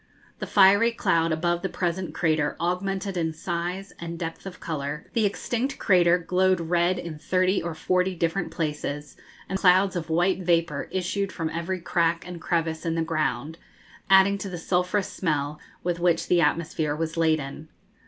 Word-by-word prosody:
The - - -4
fiery 200 +4 +5
cloud 165 -6 +1
above 170 +2 0
the 190 - -2
present 180 +1 -2
crater 155 -3 0
augmented 185 +2 -2
in 160 -2 -1
size 175 +4 -4
and 170 0 -6
depth 165 +3 -6
of 180 - -9
colour; 150 -2 -4
the 220 -3 +3
extinct 245 +6 -2
crater 180 -3 +4
glowed 185 +1 +2
red 175 +2 +1
in 165 -3 -6
thirty 185 +4 +1
or 170 -1 -4
forty 185 +3 0
different 170 +2 -1
places; 150 -2 -4 0.3
and 190 - -2
clouds 185 +1 +4
of 170 -1 -4
white 175 +3 +2
vapour 170 -1 +1
issued 190 +2 -2
from 160 -2 -3
every 170 +3 -3
crack 170 -1 0
and 175 -2 -8
crevice 165 -2 -1
in 165 -1 -1
the 165 - +1
ground, 155 -1 -2 0.5
adding 195 +1 +6
to 195 - -5
the 180 - -5
sulphurous 180 +4 0
smell 150 -3 -1 0.2
with 175 -1 -1
which 170 -1 +1
the 175 -1 +4
atmosphere 155 -1 0
was 160 +1 -3
laden. 155 -2 0
170 Hz, 165 wpm, -25 LUFS, 160-185 Hz, 0.5 s, adding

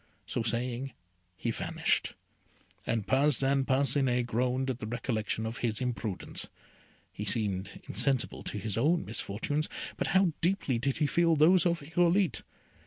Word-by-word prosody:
So 120 - -2
saying, 120 +3 -1 0.4
he 115 - -1
vanished, - - 0 0.7
and 115 -3 0
Parcin 135 0 +3
Parcinet 130 -2 +2
groaned 125 +3 0
at 125 - -6
the 110 - -5
recollection 110 -2 -2
of 115 +1 -4
his 110 -3 -1
imprudence: 120 -6 -3 0.6
he 105 - -5
seemed 100 -3 0
insensible 125 +5 +1
to - - -4
his 105 +1 -2
own 160 +7 +2
misfortunes, 115 +8 -2 0.3
but - - -1
how 190 -4 +3
deeply 165 -9 +1
did 135 +2 0
he 155 - +2
feel 165 +3 +3
those 170 +4 +5
of 170 -2 0
Irolite! 175 +2 +2
130 Hz, 140 wpm, -30 LUFS, 115-150 Hz, 0.7 s, those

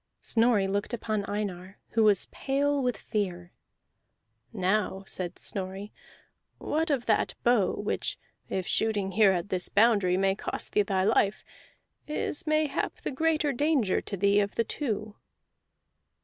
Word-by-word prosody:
Snorri 225 -4 +2
looked 205 +4 -1
upon 215 -3 -2
Einar, 195 -2 -4
who 225 - +2
was 205 -3 +4
pale 280 +1 0
with 250 -4 0
fear. 180 -4 -3 1.0
"Now," 195 -1 0
said 180 -2 -5
Snorri, 195 +1 -5 0.6
"what 320 +2 -1
of 265 -5 0
that 215 - +1
bow 235 -5 +3
which, 205 - -2 0.3
if 190 -1 -2
shooting 205 -3 0
here 205 0 +5
at 180 +1 -2
this 180 -1 -1
boundary 200 -4 +4
may 195 0 +2
cost 195 - -5
thee 210 - +3
thy 190 -2 0
life, 205 -1 +2 0.6
is 305 +2 -3
mayhap 310 -1 0
the - - -3
greater 305 0 +1
danger 275 -7 +1
to 200 - -5
thee 200 +2 +4
of 200 -1 -1
the 230 - +2
two?" 215 -4 -3
210 Hz, 140 wpm, -28 LUFS, 195-245 Hz, 1.0 s, here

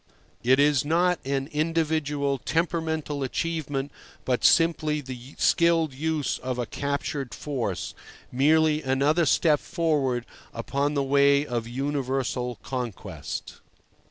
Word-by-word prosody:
It 130 +3 +4
is 145 -1 +4
not 175 +4 +2
an 135 0 -1
individual, 150 -3 0
temperamental 160 -2 -1
achievement, 145 0 -2 0.3
but 125 -2 0
simply 155 -2 +3
the 130 -1 -9
skilled 165 -3 +3
use 155 +1 -1
of 130 -1 -3
a 120 - -1
captured 140 -1 -3
force, 125 -10 -3 0.4
merely 155 +3 +3
another 145 +5 +2
step 150 +1 +3
forward 145 -8 0 0.3
upon 140 +5 -1
the 140 - +1
way 140 +1 +4
of 120 -4 -3
universal 130 -1 -2
conquest. 105 - -5
140 Hz, 110 wpm, -26 LUFS, 130-155 Hz, 0.4 s, It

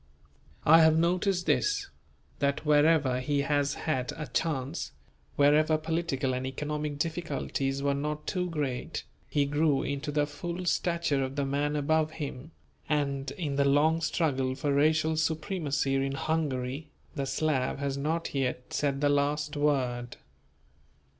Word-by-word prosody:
I 165 +2 +8
have 160 0 +5
noticed 180 +2 +1
this: 410 -1 +1 0.5
That 140 +2 0
wherever 150 -3 +4
he 140 +2 0
has 145 0 +1
had 130 -6 -2
a 155 - -5
chance, 140 +2 -2 0.4
wherever 150 +2 +4
political 155 -4 -1
and 125 0 -2
economic 150 +2 -3
difficulties 140 -4 -2
were 140 0 +2
not 150 +2 -3
too 180 -2 -1
great, 145 -6 -3 0.3
he 145 -1 +2
grew 145 -1 +2
into 140 +1 -3
the 145 0 +2
full 170 +5 -5
stature 170 -5 +1
of 130 +1 -4
the 140 -1 0
man 145 +2 0
above 155 +1 +1
him; 145 -2 -6 0.4
and 140 -2 0
in 145 -6 -3
the 140 - +3
long 155 +4 +3
struggle 135 -5 0
for 140 +1 -1
racial 155 +2 +3
supremacy 155 -3 0
in 135 0 0
Hungary, 145 -1 -2 0.2
the 135 -1 -3
Slav 145 -3 0
has 140 -1 -2
not 160 +4 -2
yet 125 -2 -2
said 140 -1 0
the 145 - +3
last 145 +1 0
word. 130 -5 0
145 Hz, 140 wpm, -29 LUFS, 140-160 Hz, 0.5 s, I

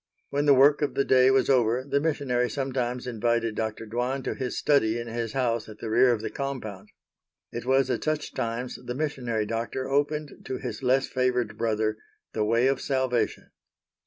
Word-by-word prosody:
When 145 +1 0
the 140 - +7
work 145 +3 +5
of 145 - -1
the 140 - +2
day 130 0 +5
was 135 -1 +3
over 125 -2 +3
the 140 - +2
missionary 140 -5 0
sometimes 125 -3 -2
invited 115 -1 0
Dr. 110 +1 -3
Dwan 125 +4 -2
to - - -2
his 130 -2 -4
study 120 -6 +2
in 120 - -5
his 115 -1 -4
house 120 -4 -1
at 105 - -10
the 110 0 -5
rear 120 +2 +5
of 115 -3 0
the - - -4
compound. 110 -8 -5 0.6
It 120 +1 -6
was 135 0 +3
at - - -2
such 155 -1 -2
times 115 +2 -3
the 125 - -5
missionary 125 -7 -2
doctor 115 +4 -3
opened 145 +2 -1
to 130 - -3
his - - -6
less 130 +1 +2
favored 125 -4 0
brother 110 -1 0 0.4
the 110 - 0
way 115 +3 +2
of 135 0 +1
Salvation. 130 -3 -1
125 Hz, 190 wpm, -26 LUFS, 115-135 Hz, 0.6 s, the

